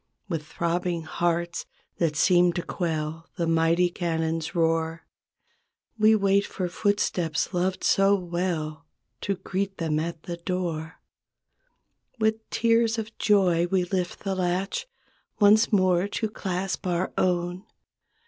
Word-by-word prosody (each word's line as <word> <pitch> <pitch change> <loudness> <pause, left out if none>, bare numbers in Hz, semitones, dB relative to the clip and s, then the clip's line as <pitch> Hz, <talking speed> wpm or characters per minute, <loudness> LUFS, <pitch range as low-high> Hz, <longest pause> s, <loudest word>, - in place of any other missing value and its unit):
With 165 -5 -3
throbbing 170 +1 -1
hearts 170 +2 -1 0.3
that 165 -3 +1
seem 175 +1 +4
to 175 - -3
quell 160 -2 -3
The 170 - 0
mighty 165 +2 +3
cannon's 165 -2 -2
roar, 165 0 0 0.9
We 220 0 +5
wait 200 -1 +3
for 185 -3 -3
footsteps 180 -5 0
loved 185 +1 0
so 195 +1 +4
well. 170 -4 -3 0.3
To 200 - -1
greet 195 +1 -3
them 155 -2 0
at 165 0 -4
the 170 -1 -5
door. 170 -3 -3 1.2
With 220 0 0
tears 230 0 +2
of 220 0 -5
joy 180 -5 +3
we 185 0 +1
lift 180 -1 -2
the 195 -2 -2
latch 190 - -1 0.5
Once 215 +2 +5
more 185 -2 +3
to 215 +2 -2
clasp 190 -2 -3
our 180 +1 -1
own. 180 0 0
180 Hz, 125 wpm, -26 LUFS, 165-195 Hz, 1.2 s, We